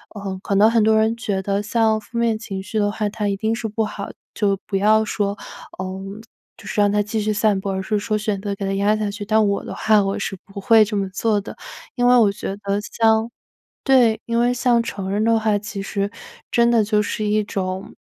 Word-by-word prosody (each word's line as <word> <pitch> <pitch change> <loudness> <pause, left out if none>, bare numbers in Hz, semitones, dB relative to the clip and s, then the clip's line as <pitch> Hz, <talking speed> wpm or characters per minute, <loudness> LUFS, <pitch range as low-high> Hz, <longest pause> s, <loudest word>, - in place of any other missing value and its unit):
呃， 195 -2 -5
可 200 - -2
能 215 +3 +5
很 230 -2 +3
多 220 0 +4
人 220 +1 +2
觉 200 -4 -2
得 200 +1 -1
像 220 0 +1
负 230 +3 -9
面 230 -2 +1
情 195 -4 -6
绪 215 +3 -3
的 205 0 +2
话， 210 0 -2
它 210 -1 -3
一 200 - 0
定 220 +3 -1
是 230 -1 -3
不 220 +1 -1
好 205 -1 -5 0.3
就 200 -2 +1
不 195 - -1
要 215 +2 +4
说， 205 -1 -2 0.4
呃， 185 - -3 0.7
就 - - -16
是 210 - -3
让 205 - +4
它 205 0 +1
继 215 +1 -3
续 215 0 0
散 205 -1 +2
播， 195 0 -3
而 190 0 -3
是 210 +1 0
说 215 +1 -1
选 210 -2 -2
择 200 0 -4
给 195 - -5
它 195 - -1
压 205 +2 +2
下 210 -1 -2
去， 205 0 -6
但 215 0 +3
我 200 0 -1
的 - - -6
话 215 -1 +3
我 195 0 -1
是 195 - -4
不 200 0 -9
会 225 0 +6
这 210 0 -4
么 195 -1 -1
做 205 +2 0
的， - - -10 0.4
因 245 -1 +2
为 250 - +6
我 210 -4 +5
觉 195 0 -5
得 200 0 -2
像 220 +1 +1 0.5
对。 245 -5 +4
因 230 0 0
为 240 +1 +2
像 240 -1 +2
成 195 -4 -5
人 210 +2 0
的 230 0 +3
话 215 -1 +1
其 205 -1 -6
实 200 0 -2 0.4
真 235 0 +4
的 225 -2 +4
就 210 0 +1
是 215 +1 -3
一 210 0 +1
种， 190 0 -4
210 Hz, 260 characters per minute, -21 LUFS, 200-220 Hz, 0.7 s, 会